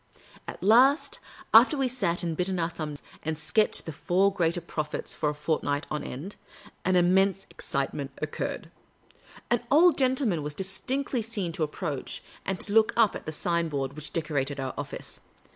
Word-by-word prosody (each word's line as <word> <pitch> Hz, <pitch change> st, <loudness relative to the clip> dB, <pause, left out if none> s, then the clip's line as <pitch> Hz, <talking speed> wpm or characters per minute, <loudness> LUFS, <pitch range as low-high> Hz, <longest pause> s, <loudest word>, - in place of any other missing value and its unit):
At -, -, -7 dB
last, 255 Hz, +9 st, +5 dB, 0.3 s
after 305 Hz, -, +8 dB
we 270 Hz, -1 st, +2 dB
had 250 Hz, -, -6 dB
sat, 175 Hz, -9 st, 0 dB
and 165 Hz, -2 st, -1 dB
bitten 185 Hz, +2 st, -1 dB
our 170 Hz, 0 st, 0 dB
thumbs, 150 Hz, -4 st, -6 dB, 0.2 s
and 160 Hz, 0 st, -3 dB
sketched 210 Hz, +8 st, +1 dB
the 160 Hz, -, -4 dB
Four 185 Hz, +6 st, +2 dB
Greater 170 Hz, -2 st, +1 dB
Prophets 155 Hz, -3 st, -4 dB
for 150 Hz, -, 0 dB
a 150 Hz, -, -3 dB
fortnight 145 Hz, -1 st, -1 dB
on 150 Hz, -, -2 dB
end, 160 Hz, +11 st, -7 dB, 0.5 s
an 185 Hz, 0 st, +2 dB
innnense 190 Hz, +2 st, +3 dB
excitement 140 Hz, 0 st, -3 dB
occurred. 155 Hz, -, -4 dB, 0.8 s
An 240 Hz, -, +3 dB
old 315 Hz, +2 st, +6 dB
gentleman 255 Hz, -, +2 dB
was 145 Hz, 0 st, -4 dB
distinctly 250 Hz, +7 st, -2 dB
seen 210 Hz, -6 st, -3 dB
to 165 Hz, -, -6 dB
approach 150 Hz, -2 st, -3 dB, 0.2 s
and 190 Hz, -1 st, -1 dB
to 205 Hz, -, -3 dB
look 220 Hz, 0 st, +5 dB
up 225 Hz, -3 st, +4 dB
at -, -, -8 dB
the -, -, -2 dB
sign 170 Hz, +1 st, -1 dB
board 135 Hz, -2 st, -2 dB
which 150 Hz, +1 st, -5 dB
decorated 145 Hz, -3 st, -1 dB
our 135 Hz, -1 st, -3 dB
office. -, -, -6 dB
175 Hz, 175 wpm, -28 LUFS, 150-210 Hz, 0.8 s, after